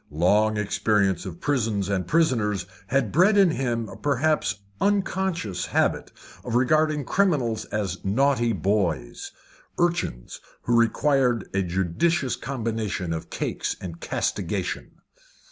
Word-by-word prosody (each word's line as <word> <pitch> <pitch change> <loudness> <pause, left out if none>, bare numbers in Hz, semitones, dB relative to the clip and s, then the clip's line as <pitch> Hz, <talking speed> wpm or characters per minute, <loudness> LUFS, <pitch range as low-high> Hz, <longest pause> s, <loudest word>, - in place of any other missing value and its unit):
Long 105 +8 +2
experience 100 -3 +1
of 85 -2 -8
prisons 115 -9 0
and 95 -2 -1
prisoners 115 - +1 0.2
had 125 -5 +1
bred 190 +6 +4
in 195 -4 +6
him 120 -6 -1
a - - -10
perhaps 145 +2 +1 0.3
unconscious 190 - 0
habit - - 0 0.3
of 120 -2 -3
regarding 150 +3 +2
criminals 135 - +1
as 95 -4 -3
naughty 120 +3 +2
boys 90 - -1 0.5
urchins 170 - -1 0.2
who 120 - +1
required 120 0 +2
a 95 - +1
judicious 95 - 0
combination 110 -8 -3
of 80 - -6
cakes - - -3
and 85 -2 -7
castigation. - - -2
115 Hz, 115 wpm, -25 LUFS, 95-145 Hz, 0.5 s, in